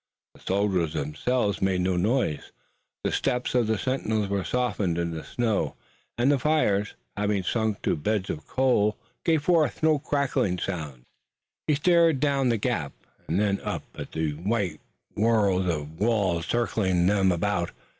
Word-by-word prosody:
The - - -19
soldiers 95 -5 0
themselves 100 - -1
made 95 -1 +1
no 90 0 +1
noise. 95 - 0 0.5
The - - 0
steps 125 -2 -1
of 120 -3 +2
the 110 0 +1
sentinels 110 -3 -1
were 100 -1 0
softened 105 -9 0
in 85 -1 -1
the 80 -1 -5
snow, 115 -4 -1 0.4
and 125 +4 +3
the 140 - +2
fires, 110 -10 +1 0.2
having 105 -1 0
sunk 110 +1 -1
to - - +1
beds 100 +5 -1
of 75 -2 -7
coals, 120 -5 +2 0.3
gave 160 -3 +2
forth 160 -2 +2
no 155 -2 +4
crackling 135 -11 0
sounds. 75 -9 -5 0.6
He 150 - +3
stared 165 -1 +4
down 140 -2 +2
the 115 - +2
gap, - - -2 0.3
and 85 +4 0
then 100 -1 +1
up - - -3
at - - -8
the 80 -1 -1
white 90 +1 -2 0.3
world 100 -4 +2
of 80 0 -4
walls 100 -7 +1
circling 95 -7 +1
them 95 -1 +3
about. 90 0 0
105 Hz, 155 wpm, -26 LUFS, 90-125 Hz, 0.6 s, no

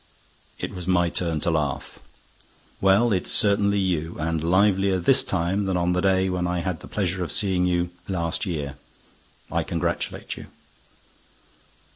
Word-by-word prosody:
It - - -5
was 90 -2 -7
my 90 -2 +3
turn 85 -3 -1
to 85 - +1
laugh: 75 -4 -2 0.8
"Well, 100 +4 +4
it's 90 - 0
certainly 100 -1 +4
you, 85 -4 -1
and 80 0 -1
livelier 95 +2 +3
this 130 +10 +5
time 95 +3 -1
than 95 -2 0
on 90 0 +1
the 90 - 0
day 95 0 +2
when 90 -1 -1
I 90 0 -1
had 90 -2 -3
the - - -11
pleasure 95 -3 -2
of 85 - -4
seeing 95 -4 +1
you, 90 0 0 0.2
last 85 -4 -2
year—I 70 -4 -7
congratulate 85 0 -3
you." - - -10
90 Hz, 150 wpm, -24 LUFS, 85-95 Hz, 0.8 s, this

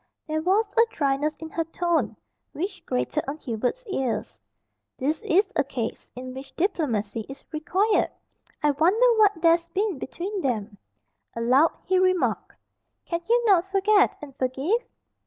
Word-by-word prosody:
There 310 0 -1
was 390 +7 +3
a 460 - +6
dryness 290 +1 0
in 320 - -8
her 330 - -1
tone 340 +1 -1 0.4
which 370 +7 -4
grated 125 0 -1
on 285 +2 -3
Hubert's 255 - -3
ears. 265 - -3 0.6
"This 300 +4 -1
is 395 +5 +2
a 280 - +3
case 250 -4 -5
in 255 +1 -7
which 265 +1 -10
diplomacy 230 - -1
is 270 - -10
required. 370 +7 +1 0.5
I 295 - +4
wonder 435 - +3
what 415 -1 +6
there's 335 0 +4
been 380 -2 -1
between 380 +9 -4
them." 220 - -2 0.6
Aloud 255 +7 +4
he 370 0 +3
remarked, 370 -1 +1 0.5
"Can 335 -1 -2
you 480 +1 +4
not 385 -3 +4
forget 400 +1 +3
and 275 -3 -9
forgive?" 270 - 0
325 Hz, 145 wpm, -25 LUFS, 270-390 Hz, 0.6 s, a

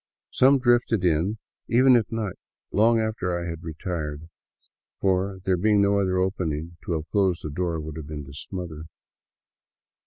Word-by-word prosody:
Some 135 +2 +5
drifted 120 -5 +2
in 90 +6 +1 0.3
even 130 +2 +5
at 115 -3 +1
night, 110 -4 -3 0.3
long 115 +3 +4
after 110 -6 -1
I 85 - -4
had 85 -1 -5
retired, 80 -2 -5 0.7
for, 95 0 +1
there 95 -1 +1
being 105 +3 +3
no 100 0 +3
other 95 -2 +1
opening, 85 -4 -2
to 85 - -1
have 80 0 -3
closed 95 -4 +1
the 75 - -4
door 85 +1 -2
would 80 0 -7
have 75 -2 -7
been 75 -2 -6
to 70 - -12
smother. 80 0 -6
90 Hz, 160 wpm, -25 LUFS, 80-105 Hz, 0.7 s, Some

